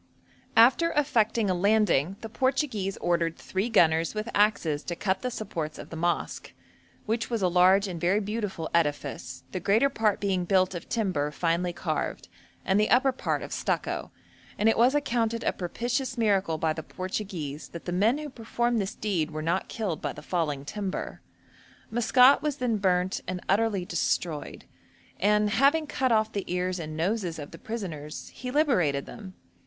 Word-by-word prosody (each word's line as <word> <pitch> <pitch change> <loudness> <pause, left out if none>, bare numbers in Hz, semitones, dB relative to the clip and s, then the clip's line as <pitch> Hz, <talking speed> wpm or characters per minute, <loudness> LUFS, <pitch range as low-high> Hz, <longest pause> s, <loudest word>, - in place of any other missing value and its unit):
After 260 +9 +6
effecting 230 -7 +2
a 185 - +2
landing, 195 -4 +2
the 225 - -5
Portuguese 225 -4 -1
ordered 170 -1 0
'three 190 +5 -2
gunners 165 -4 +3
with 215 +2 -3
axes 200 -8 +2
to 175 - -3
cut 190 +1 -1
the 255 - -1
supports 170 -10 -5
of - - -10
the - - -6
mosque, 170 +2 -2 0.5
which 225 +1 -1
was 230 -5 -1
a - - +4
large 185 +3 +4
and 175 -3 -6
very 185 +4 +3
beautiful 205 -5 -3
edifice, 150 -4 -1
the 185 - -3
greater 215 +10 +3
part 220 -6 +1
being 190 -3 0
built 185 +1 +2
of 175 -1 -7
timber 185 -10 0
finely 170 +3 0
carved, - - -3 0.4
and 190 +2 +3
the 215 - +2
upper 265 +2 +4
part 260 - -2
of - - -6
stucco,' - - -2 0.5
and 210 - +2
it 225 - +4
was 245 +5 +4
accounted 230 -5 0
a - - +1
propitious 245 +7 -2
miracle 195 -7 +2
by 160 0 0
the 160 - -5
Portuguese 185 -5 -5
that 170 - -9
the 175 - -3
men 210 +9 +3
who 300 0 -5
performed 235 -2 -1
this 195 - -4
deed 180 -8 -1
were 155 0 -5
not 170 +4 0
killed 195 -9 -3
by - - -2
the - - -11
falling 150 -6 -2
timber. 195 +3 -4 0.7
Maskat 250 +3 +5
was 300 -2 -1
then 245 -4 0
burnt 185 -2 +1
and 185 0 -3
utterly 200 -2 +1
destroyed; 170 -2 -2 0.5
and 210 +1 +3
'having 280 +7 +3
cut 260 -3 0
off 220 -1 +2
the 200 -3 -4
ears 180 0 -1
and 155 -1 -6
noses 180 0 -1
of 145 -2 -8
the - - -11
prisoners 165 -10 -6
he 255 - -6
liberated 205 - +2
them.' 190 -4 -10
195 Hz, 175 wpm, -27 LUFS, 175-230 Hz, 0.7 s, After